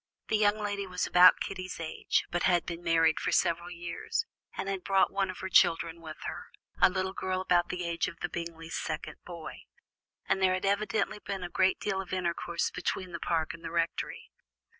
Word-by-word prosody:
This 215 - +2
young 210 0 +4
lady 205 -2 -3
was 180 -1 -1
about 180 +1 +7
Kitty's 185 -2 -5
age, 165 -1 0
but 175 - 0
had 175 -2 +3
been 170 0 -5
married 165 -2 +3
for - - -1
several 170 0 +2
years, 175 - -3 0.3
and - - -3
had 195 -2 -2
brought 195 -1 +3
one 195 -1 +1
of 185 - -5
her 190 - -3
children 165 -2 +3
with 155 -1 -8
her, - - -5 0.3
a - - +8
little 190 0 -2
girl 185 -1 -2
about 175 -2 +2
the 180 0 -3
age 170 0 0
of 170 - -8
the - - -1
Bingleys' 165 -1 -6
second 155 - -4
boy, 170 -3 -8 0.7
and 190 - +1
there 185 -1 +4
had 185 - -3
evidently 205 +1 0
been 195 -2 -5
a 175 - -4
great 190 +1 +2
deal 195 -2 -1
of 190 0 -8
intercourse 170 -1 -1
between 180 0 -3
the 170 - -5
Park 160 -2 0
and 165 - -11
the - - -4
Rectory. 165 0 -2
180 Hz, 205 wpm, -30 LUFS, 170-190 Hz, 0.7 s, a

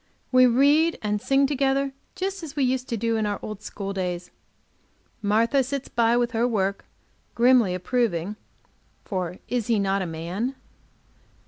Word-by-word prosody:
We 255 -1 +7
read 290 +7 +4
and 210 -1 -1
sing 270 +3 +3
together, 275 0 +1 0.2
just 385 +1 -3
as 310 -3 -8
we 285 - +1
used 255 0 0
to 230 - -1
do 230 +1 0
in 215 -1 0
our 205 - -1
old 215 -1 -6
school 200 -2 -5
days. 180 -2 -3 0.9
Martha 225 +6 +3
sits 270 +1 -4
by, 235 0 +2
with 240 -1 +1
her 235 0 +1
work, 200 -4 -1 0.5
grimly 235 -6 +4
approving; 200 -2 -1 0.7
for 180 -2 -3
is 245 -3 -1
he 230 -2 +2
not 195 -1 +1
a 185 - -2
man? 175 +11 -3
230 Hz, 155 wpm, -25 LUFS, 200-265 Hz, 0.9 s, We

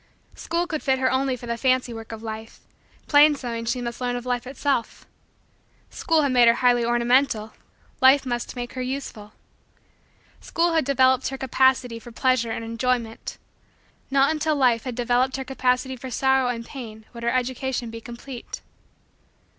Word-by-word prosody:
School 340 +1 -2
could 320 -3 -4
fit 265 -2 +1
her 260 0 +1
only 260 0 +1
for 240 - -10
the 235 0 -3
fancy 255 0 +1
work 225 0 -9
of 225 0 -8
Life: 220 0 -7 0.5
plain 295 0 +6
sewing 235 -4 -5
she 245 +2 -1
must 235 +1 -5
learn 245 -1 -1
of 245 0 -5
Life 245 0 -2
itself. 270 -3 -2 0.9
School 320 -2 +1
had 280 - +1
made 245 -2 +5
her 230 - +6
highly 245 -1 +3
ornamental: 240 -1 +2 0.5
Life 265 +1 +6
must 240 -1 -3
make 245 -1 -5
her 255 - -4
useful. 250 -5 -5 1.1
School 340 0 0
had 320 -4 +2
developed 260 -1 +3
her 270 - -4
capacity 260 -2 +2
for 240 - -12
pleasure 255 -1 +1
and 225 0 -4
enjoyment: 230 0 -2 0.7
not 275 +2 +3
until 310 0 0
Life 250 -4 +2
had 250 -2 -4
developed 250 +2 +1
her 265 - -5
capacity 255 0 0
for 255 +1 -8
sorrow 265 +1 +2
and 230 -1 -3
pain 220 -6 -9
would 235 - -9
her 235 - 0
education 255 -1 -2
be 230 0 -8
complete. 240 +2 -9
250 Hz, 170 wpm, -24 LUFS, 235-265 Hz, 1.1 s, plain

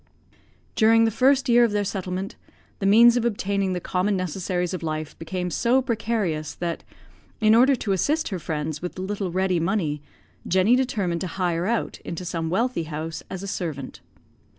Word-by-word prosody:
During 225 0 +5
the 225 - +2
first 270 +4 +3
year 240 0 +6
of 230 -3 +2
their 205 0 +1
settlement, 190 -1 -4 0.4
the 195 - 0
means 235 +4 +7
of 240 - 0
obtaining 200 -4 0
the 180 - -2
common 190 +3 0
necessaries 180 0 -2
of 185 - -4
life 155 -1 -4
became 180 +2 -3
so 240 +9 +2
precarious, 220 - -2
that, 170 -1 -4 0.6
in 215 -1 +5
order 255 +4 +6
to 225 -4 -3
assist 300 - +1
her 190 -4 -3
friends 155 -2 -4
with 180 +1 -6
a - - -4
little 195 -1 -3
ready 185 -1 +1
money, 165 -5 -1 0.5
Jenny 190 +6 +4
determined 200 -10 -1
to 185 - -2
hire 175 -1 -1
out 235 0 -1
into 175 +2 -6
some 165 -2 -3
wealthy 225 -1 0
house 160 +1 -5
as 190 0 -6
a - - -5
servant. 160 -8 -5
190 Hz, 175 wpm, -24 LUFS, 170-225 Hz, 0.6 s, means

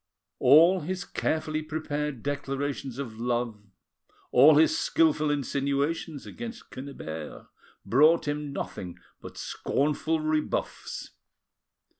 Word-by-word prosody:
All 165 +8 +7
his 180 +4 -4
carefully 155 0 -1
prepared 150 -4 -3
declarations 140 -2 -3
of 115 -5 -6
love, 120 -2 -1 0.7
all 145 +5 +7
his 160 - +5
skilful 320 - +2
insinuations 140 +2 -1
against 235 0 -8
Quennebert, 80 - -7 0.4
brought 155 +6 +4
him 145 0 -2
nothing 90 -9 -6 0.2
but - - -10
scornful 155 +3 -1
rebuffs. 155 0 -2
145 Hz, 95 wpm, -27 LUFS, 135-155 Hz, 0.7 s, All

